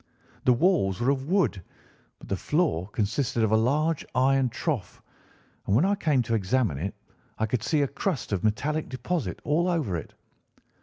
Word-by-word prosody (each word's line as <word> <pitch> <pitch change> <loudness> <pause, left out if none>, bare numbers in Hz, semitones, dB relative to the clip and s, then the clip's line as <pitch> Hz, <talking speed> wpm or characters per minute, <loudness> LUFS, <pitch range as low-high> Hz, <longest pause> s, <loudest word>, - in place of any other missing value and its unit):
The 125 - +6
walls 120 - +2
were 120 +3 +2
of 135 0 -2
wood, 180 - +2 0.6
but - - -14
the 95 - -1
floor 150 - 0
consisted 115 +3 0
of 110 - +2
a - - +5
large 145 +8 +1
iron 135 0 +3
trough, 120 - -3 0.7
and 100 - +2
when 140 +10 +4
I 200 - +3
came 150 -10 +1
to 115 - -3
examine 105 - +1
it 95 +6 -3 0.4
I 110 - +1
could 110 +1 -1
see 145 +6 +1
a - - +1
crust 165 - -3
of 100 -3 -1
metallic 145 +9 0
deposit 130 - -3
all 165 +4 +1
over 150 - 0
it. 80 - -7
130 Hz, 175 wpm, -27 LUFS, 105-155 Hz, 0.7 s, The